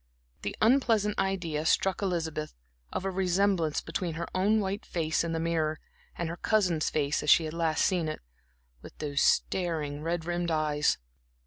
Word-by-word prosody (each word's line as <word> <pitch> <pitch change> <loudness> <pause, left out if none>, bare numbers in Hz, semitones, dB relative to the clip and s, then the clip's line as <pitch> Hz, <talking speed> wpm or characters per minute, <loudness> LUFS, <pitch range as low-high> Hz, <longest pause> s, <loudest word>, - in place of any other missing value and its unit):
The 100 - -4
unpleasant 225 -4 +3
idea 180 -6 -1
struck 190 +4 +2
Elizabeth 165 -5 -2 0.4
of 190 - -3
a 195 - 0
resemblance 185 -3 +1
between 165 0 -3
her 170 +1 -3
own 205 +4 +3
white 200 0 -2
face 160 -2 -1
in 170 - -2
the 165 - -1
mirror, 160 -2 0 0.4
and 170 - -2
her 170 +1 -5
cousin's 180 -8 +1
face 145 -1 0
as 150 - -2
she 165 - +6
had 155 - -5
last 165 -2 +1
seen 175 -4 +1
it, 155 - -4 0.6
with - - -13
those 145 -2 -1
staring, 155 -5 +1
red 165 +1 -2
rimmed 175 0 -1
eyes. 150 -2 +1
170 Hz, 165 wpm, -29 LUFS, 155-190 Hz, 0.6 s, she